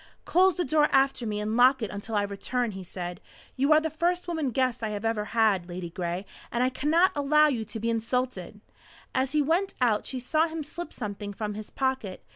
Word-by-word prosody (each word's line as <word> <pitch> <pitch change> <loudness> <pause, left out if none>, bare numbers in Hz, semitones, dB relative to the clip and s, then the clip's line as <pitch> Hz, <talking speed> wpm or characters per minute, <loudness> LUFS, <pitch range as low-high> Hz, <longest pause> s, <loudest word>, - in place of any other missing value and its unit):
"Close 375 +1 +4
the 355 - -1
door 300 +1 +3
after 270 -3 +2
me 210 -1 -2
and 215 +1 -2
lock 250 +1 +5
it 215 - -3
until 205 +2 -5
I 205 - +2
return," 220 +4 -2
he 190 -1 -7
said. 175 0 -6 0.3
"You 275 +3 +2
are 305 - +8
the 315 0 -3
first 350 +3 0
woman 320 -5 -1
guest 255 -1 0
I 215 -1 -2
ever 210 0 -1
had, 210 -5 +2
Ladygray. 175 +1 -4 0.3
I 250 +2 +2
cannot 325 +8 +3
allow 300 +1 +4
you 240 -6 -1
to 215 +2 -7
be 230 +2 0
insulted!" 230 -3 -2 0.5
As 260 +1 0
he 300 -1 +3
went 345 +7 +1
out 230 -5 +2
she 260 - -4
saw 310 +6 +1
him 320 -1 -5
slip 340 +3 -7
something 205 -2 -5
from 210 0 -4
his 215 0 -7
pocket. 260 -8 -2
245 Hz, 205 wpm, -27 LUFS, 210-295 Hz, 0.5 s, are